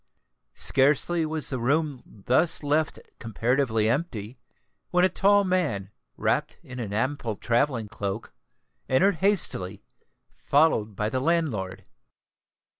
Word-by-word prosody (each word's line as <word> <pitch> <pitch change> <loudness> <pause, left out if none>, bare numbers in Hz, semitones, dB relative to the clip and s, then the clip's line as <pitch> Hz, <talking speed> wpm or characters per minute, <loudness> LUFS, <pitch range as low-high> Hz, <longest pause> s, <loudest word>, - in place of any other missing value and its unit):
Scarcely 150 +5 +3
was 155 -2 -2
the 130 - -2
room 145 +2 0 0.2
thus 160 +6 +3
left 150 +2 0 0.2
comparatively 115 -1 0
empty, 120 - -3 0.5
when 180 +1 +3
a - - +3
tall 200 +3 +3
man, 165 - -1 0.3
wrapped - - -1
in 130 0 -9
an 110 -4 -5
ample 115 +1 -2
travelling 120 0 0
cloak, 105 0 -5 0.6
entered 170 +8 +3
hastily, 125 - 0 0.5
followed 140 -8 +1
by 105 +2 -1
the 130 - -1
landlord. 135 - -1
130 Hz, 115 wpm, -26 LUFS, 110-160 Hz, 0.6 s, Scarcely